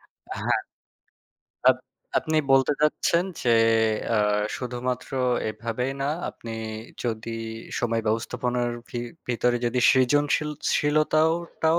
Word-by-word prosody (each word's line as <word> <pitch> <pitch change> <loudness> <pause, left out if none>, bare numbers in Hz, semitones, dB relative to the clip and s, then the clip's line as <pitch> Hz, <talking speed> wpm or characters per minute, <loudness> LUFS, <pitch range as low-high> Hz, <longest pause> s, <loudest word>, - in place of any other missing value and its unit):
আ - - -12
হ্যা। - - +3 1.1
আপ-আপনি 155 0 -3
বলতে 135 +1 +5
চাচ্ছেন 160 +3 +2 0.2
যে 120 - +2 0.6
আ - - +3 0.4
শুধুমাত্র 125 0 -3 0.4
এভাবেই 115 +4 -3
না, - - 0 0.2
আপনি 115 - -9 0.5
যদি 115 -1 -3 0.5
সময় 115 -1 0
ব্যবস্থাপনার 120 +2 0 0.2
ভি-ভিতরে 120 0 -2
যদি 120 +1 0
সৃজনশীল 145 +4 +2 0.3
শীলতাও 155 +2 +3 0.3
টাও 160 +1 +4
125 Hz, 95 wpm, -25 LUFS, 120-145 Hz, 1.1 s, বলতে